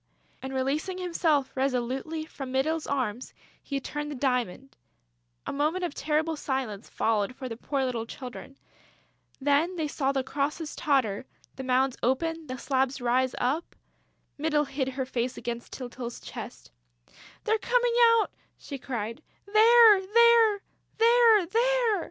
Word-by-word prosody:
And 265 - -6
releasing 280 +8 -1
himself 330 -6 +1
resolutely 265 +4 -2
from 270 -4 -8
Mytyl's 305 +5 0
arms, 255 -4 -3 0.3
he 275 -1 -3
turned 295 +2 -5
the 295 - -5
diamond.... 250 -1 -2 0.7
A - - -4
moment 305 +6 0
of 345 - -2
terrible 315 +2 0
silence 265 -8 -4
followed 220 +1 0
for 260 - -6
the 230 - -5
poor 270 +3 -2
little 235 -3 -3
children. 260 +2 -9 0.8
Then 290 +6 +2
they 320 -3 -1
saw 275 -2 0
the 270 -1 -1
crosses 295 +4 -3
totter, 260 -8 0 0.3
the 265 - -6
mounds 260 0 +1
open, 325 +5 -1
the 255 0 -5
slabs 265 +1 0
rise 250 +1 +1
up.... 285 +7 -1 0.6
Mytyl 300 -1 +1
hid 270 -1 -2
her 265 0 -3
face 250 -1 -2
against 235 -1 -5
Tyltyl's 245 -2 -7
chest: - - -9 0.7
"They're 440 0 +1
coming 485 0 +1 0.3
out!" 435 - -1 0.3
she 280 -2 -8
cried. 230 -3 -5 0.2
"They're 435 0 +7
there!... 450 0 +5 0.4
They're 455 -3 +5
there!..." 465 +2 +2
275 Hz, 140 wpm, -27 LUFS, 255-335 Hz, 0.8 s, They're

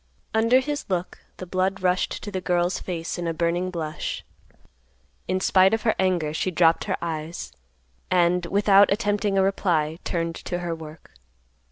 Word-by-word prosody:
Under 230 +4 +4
his 290 +1 -4
look, 180 -1 -2 0.2
the 185 - -7
blood 185 +2 -1
rushed 180 0 0
to 205 - -6
the 190 -2 -3
girl's 175 0 0
face 170 -1 -4
in 170 - -2
a 165 - -2
burning 175 +2 0
blush. 160 -4 -4 1.0
In 185 +1 0
spite 190 +2 +4
of 225 - -6
her 220 - +3
anger 175 -5 +1
she 170 - -1
dropped 165 -2 +3
her - - -1
eyes, 160 - -5 0.6
and, 175 -1 +2
without 200 +1 +5
attempting 205 -1 0
a 190 - +4
reply, 170 -5 0
turned 165 -1 -2
to 175 - -4
her 175 -1 -3
work. 160 -1 -11
180 Hz, 165 wpm, -24 LUFS, 170-195 Hz, 1.0 s, without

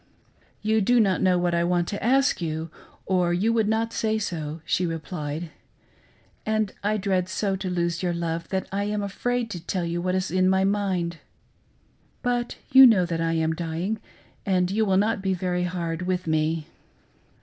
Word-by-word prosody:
"You 220 +1 +2
do 245 +5 +4
not 195 -4 +2
know 185 -1 +3
what 175 0 0
I 170 0 +2
want 175 0 +1
to 205 - -4
ask 265 -2 +3
you, 160 0 -3 0.3
or 180 -2 +2
you 215 +6 +1
would 220 -2 +2
not 225 +1 0
say 220 -1 0
so," 160 -6 -4
she 175 - +1
replied; 160 -1 -5 0.9
"and 215 -2 0
I 210 +1 +1
so - - 0
dread 190 -3 0
to 190 0 -2
lose 170 -1 -1
your 180 -2 0
love 170 -1 -3
that 190 -1 -2
I 200 +1 -1
am 210 0 -1
afraid 240 +4 -2
to 180 - -4
tell 180 0 -2
you 170 +1 -2
what 185 +1 0
is 185 -2 -1
in 185 +1 +3
my 190 0 +3
mind. 190 -4 0 1.1
But 245 -1 -1 0.2
you 265 0 +10
know 200 -6 +4
that 165 -1 -2
I 165 0 +1
am 160 0 +1
dying 170 +6 -3 0.4
and 185 -2 +1
you 220 +2 +2
will 190 -2 +2
not 210 +1 +1
be 190 -1 0
very 180 0 -1
hard 170 -2 -3
with 185 -1 -1
me." 155 0 0
185 Hz, 185 wpm, -25 LUFS, 170-205 Hz, 1.1 s, you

